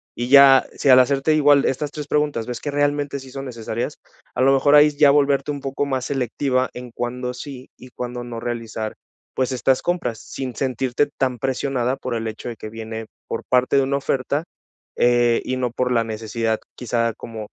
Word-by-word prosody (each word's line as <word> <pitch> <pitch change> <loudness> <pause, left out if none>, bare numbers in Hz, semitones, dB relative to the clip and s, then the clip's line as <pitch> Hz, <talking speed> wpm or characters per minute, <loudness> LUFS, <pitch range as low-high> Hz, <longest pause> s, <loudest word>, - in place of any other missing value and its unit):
Y 120 +1 -3
ya 135 -1 +8
si 140 - 0
al 130 0 +9
hacerte 135 +4 +3
igual 145 -2 +5
estas 145 +2 -1
tres 150 -1 -6
preguntas 150 -7 0
ves 125 -1 -4
que 145 - -3
realmente 145 -1 0
sí 130 0 -12
son 135 +1 -6
necesarias. 115 +2 -4 0.4
A 125 - 0
lo 135 +1 +5
mejor 140 +2 +3
hay 150 0 +7
ya 140 - +6
volverte 140 0 +2
un 145 -1 -5
poco 135 +1 -2
más 130 -2 -2
selectiva 130 0 0
en 125 0 -8
cuándo 125 +1 -4
sí 130 -1 -9
y 125 - -13
cuándo 125 -1 -6
no 120 -1 -6
realizar, 115 -2 -4 0.4
pues 130 0 0
estas 130 +1 +2
compras, 125 -11 -1
sin 130 +1 -6
sentirte 130 +1 0
tan 130 -2 0
presionada 135 -1 -1
por 125 -2 -4
el 115 0 -3
hecho 110 +2 -6
de 115 - -6
que 110 - -7
viene 110 0 -6 0.2
por - - -4
parte 125 +1 +2
de 135 - +4
una 140 +1 0
oferta, 140 +2 -1 0.5
eh, 120 -1 +3
y 130 - -2
no 125 -1 0
por 125 +1 -1
la 115 -2 +3
necesidad, 110 0 -2 0.2
quizá, 115 -1 -1
como 110 -2 -8
130 Hz, 200 wpm, -22 LUFS, 120-140 Hz, 0.5 s, al